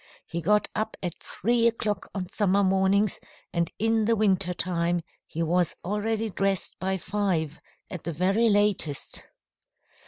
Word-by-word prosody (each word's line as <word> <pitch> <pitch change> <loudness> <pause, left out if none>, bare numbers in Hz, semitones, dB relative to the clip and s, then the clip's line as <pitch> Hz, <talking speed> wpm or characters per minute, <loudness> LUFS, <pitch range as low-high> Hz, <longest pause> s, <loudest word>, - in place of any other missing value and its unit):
He 170 - -4
got 210 +5 +3
up 220 +1 -2
at 175 -2 -2
three 235 +3 +1
o'clock 215 -3 -1
on 185 -2 -2
summer 200 +1 +2
mornings, 195 +1 +2 0.3
and 170 -1 0
in 225 0 +2
the 230 +1 +3
winter 195 -4 +2
time 175 -1 0 0.3
he 165 - -2
was 175 +1 +1
always 215 +2 -1
dressed 195 0 +1
by 190 +1 0
five, 180 -6 -1 0.3
at 180 - -7
the 170 - -3
very 195 +8 +3
latest. 205 -8 +1
195 Hz, 145 wpm, -27 LUFS, 175-210 Hz, 0.3 s, got